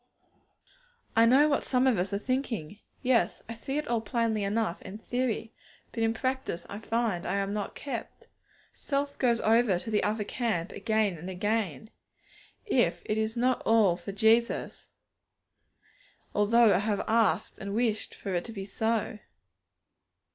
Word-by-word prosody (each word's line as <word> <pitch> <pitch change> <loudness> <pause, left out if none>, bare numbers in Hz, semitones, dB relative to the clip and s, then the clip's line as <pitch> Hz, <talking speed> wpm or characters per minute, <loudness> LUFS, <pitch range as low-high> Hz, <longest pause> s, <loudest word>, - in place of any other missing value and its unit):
I 225 +1 +6
know 270 +5 +6
what 285 -2 +1
some 255 0 +2
of 250 -8 +3
us 185 +2 -1
are 200 - 0
thinking. 220 - -3 0.2
'Yes; 250 -2 +2
I 230 - -5
see 270 +5 -4
it 300 - -2
all 235 -2 0
plainly 225 -2 0
enough 200 -3 -1
in 200 - -8
theory, 235 -1 -2 0.4
but 230 - -4
in 225 0 +3
practice 260 -5 -3
I 205 - -7
find 225 -5 -1
I 180 - -1
am 200 0 -1
not 210 -1 -4
kept. 280 - -6 0.5
Self 280 0 -2
goes 240 -3 +3
over 220 -3 +3
to 220 +5 -6
the 210 - +2
other 210 +1 0
camp 205 -6 -2
again 215 -5 0
and 175 +4 -7
again. 205 - -2 0.7
If - - +1
is 220 +2 -1
not 250 +1 +2
all 220 -6 +4
for 200 - -7
Jesus, 225 +4 +1 1.5
though 220 +1 +5
I 180 - +3
have 205 -1 -1
asked 220 -5 +1
and 200 0 -4
wished 225 -2 -1
for 195 - -5
it 175 -1 0
to 230 - -7
be 195 -3 -6
so.' 220 +1 -1
220 Hz, 155 wpm, -29 LUFS, 200-235 Hz, 1.5 s, I